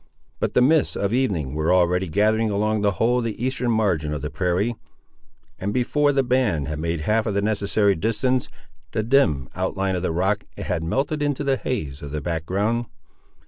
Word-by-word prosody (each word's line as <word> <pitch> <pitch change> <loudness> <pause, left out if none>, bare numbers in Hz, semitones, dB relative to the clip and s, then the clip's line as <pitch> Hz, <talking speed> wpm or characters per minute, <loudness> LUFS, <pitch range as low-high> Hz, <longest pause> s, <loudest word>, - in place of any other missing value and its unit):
But - - -2
the 125 - +5
mists 155 +3 +3
of 100 +2 -1
evening 95 - 0
were 80 +1 0
already 90 0 +3
gathering 110 +5 +2
along 105 +1 0
the 100 -1 +2
whole 120 +5 +2
of - - -2
the 115 -2 -4
eastern 130 -2 -1
margin 90 -10 +1
of 75 - -6
the 75 - -3
prairie, 90 +8 0 0.9
and 100 +2 -2
before 145 +5 +2
the 135 -1 +2
band 120 - +1
had 75 0 -4
made 85 0 -2
half 110 +7 +1
of 105 - -1
the 100 - +2
necessary 100 -1 +2
distance, 115 +7 0 0.4
the 110 - 0
dim 105 - +2
outline 95 -1 -1
of 90 - -2
the 90 - -1
rock 95 +5 0
had 90 -3 -2
melted 135 - -1
into 145 -1 0
the 135 -1 +2
haze 75 - -4
of 70 - -6
the 75 +2 -3
back 80 +1 -3
ground. 110 +5 0
105 Hz, 195 wpm, -23 LUFS, 85-120 Hz, 0.9 s, the